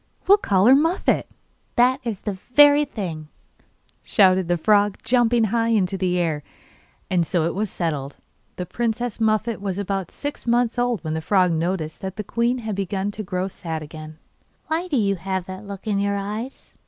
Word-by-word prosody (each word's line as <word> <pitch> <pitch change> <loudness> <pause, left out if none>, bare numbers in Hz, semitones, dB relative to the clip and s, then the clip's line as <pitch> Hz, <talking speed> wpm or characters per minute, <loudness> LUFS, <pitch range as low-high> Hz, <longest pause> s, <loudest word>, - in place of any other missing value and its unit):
We - - +4
will - - +7
call 195 - +2
her 250 - +8
Muffette.' 325 +6 +2 0.5
'That 250 +2 +4
is 225 -5 -4
the 210 - -1
very 290 +8 +5
thing,' 175 - -6 0.7
shouted 190 -4 +3
the 175 0 +1
frog, 205 +3 +3
jumping 240 -1 +3
high 230 -1 +2
into 200 -5 +1
the 180 -1 0
air; 160 -4 0 0.7
and 180 -2 +3
so 165 0 0
it 170 - -1
was 210 +2 -2
settled. 145 -6 -3 0.4
The 180 - -4
princess 235 +3 -2
Muffette 220 0 0
was 195 -2 -3
about 195 -2 -2
six 290 -3 -6
months 240 0 +2
old 245 -5 0
when 155 -1 -3
the 160 - -2
frog 185 +1 +3
noticed 160 -1 -2
that 190 -1 -5
the 210 - -4
queen 235 +4 0
had 215 - -2
begun 195 +1 -2
to 210 - -6
grow 185 -2 -2
sad 160 -4 -5
again. 155 0 -10 0.5
'Why 325 +3 -2
do 300 -6 0
you 200 -3 +1
have 190 +1 -3
that 190 +2 -8
look 200 -1 -8
in 205 -2 0
your 200 0 0
eyes? 215 +6 -6
200 Hz, 190 wpm, -23 LUFS, 180-235 Hz, 0.7 s, her